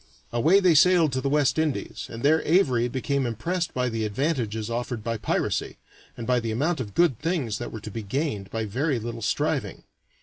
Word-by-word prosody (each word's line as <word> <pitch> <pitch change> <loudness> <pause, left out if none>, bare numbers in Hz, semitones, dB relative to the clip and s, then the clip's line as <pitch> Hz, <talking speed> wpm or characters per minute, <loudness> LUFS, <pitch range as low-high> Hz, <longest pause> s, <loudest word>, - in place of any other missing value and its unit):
Away 155 +12 +5
they 185 -3 +4
sailed 165 0 +5
to 130 0 -1
the 140 - -1
West 145 0 +2
Indies, 155 -3 -2
and 115 - -8
there 155 +3 +4
Avary 130 -9 +2
became 135 0 -1
impressed 165 - -2
by 125 0 -1
the 115 -2 -2
advantages 110 -2 -1
offered 120 -1 -3
by 115 0 -2
piracy, 105 - -1 0.4
and 115 - -5
by 125 0 +2
the 115 -1 -3
amount 145 +9 0
of 105 -6 -6
good 170 -10 +3
things 145 - -1
that 120 - -5
were 110 - -7
to 110 - -7
be 115 - -4
gained 105 -2 -3
by 110 +1 -3
very 130 +7 0
little 115 0 -5
striving. - - -1
125 Hz, 200 wpm, -25 LUFS, 115-155 Hz, 0.4 s, Away